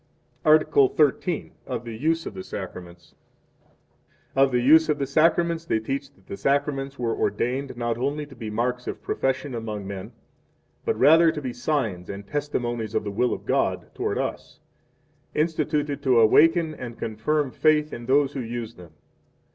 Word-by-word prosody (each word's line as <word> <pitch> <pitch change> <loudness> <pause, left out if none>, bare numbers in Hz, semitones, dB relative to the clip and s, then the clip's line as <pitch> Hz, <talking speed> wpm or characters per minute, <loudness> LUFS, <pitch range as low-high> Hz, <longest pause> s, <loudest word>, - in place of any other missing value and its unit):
Article 155 -3 +5
XIII. 155 +3 +1
Of 120 -2 -4
the 115 -1 -6
Use 165 +7 0
of - - -6
the 185 - -7
Sacraments. 90 - -9 1.2
1 135 0 +5
Of - - -8
the 125 - +2
Use 155 +6 +5
of 150 - +2
the 140 - -1
Sacraments 165 +3 +2
they 140 - +1
teach 135 +5 -4
that 95 - -26
the 100 - -7
Sacraments 140 +3 0
were 115 -2 -1
ordained, 130 +1 -1
not 120 -1 -2
only 145 +3 -1
to 140 -2 -14
be 115 -3 -6
marks 125 +3 -2
of - - -5
profession 135 +1 -1
among 110 -3 -5
men, 100 +2 -7 0.7
but - - 0
rather 165 +2 +6
to 155 - -5
be 130 -4 -4
signs 115 - -2
and 100 0 -6
testimonies 120 -6 -3
of - - +1
the 100 - -4
will 120 +5 +1
of - - -5
God - - +1
2 - - -23
toward - - -2
us, - - -4 0.8
instituted 150 -2 0
to 125 -3 +4
awaken 160 +8 +5
and 120 -5 -8
confirm 130 +6 -1
faith 150 +1 +2
in 120 0 -7
those 140 +1 +3
who 140 - -4
use 115 -1 -5
them. 90 -7 -15
135 Hz, 175 wpm, -25 LUFS, 115-150 Hz, 1.2 s, rather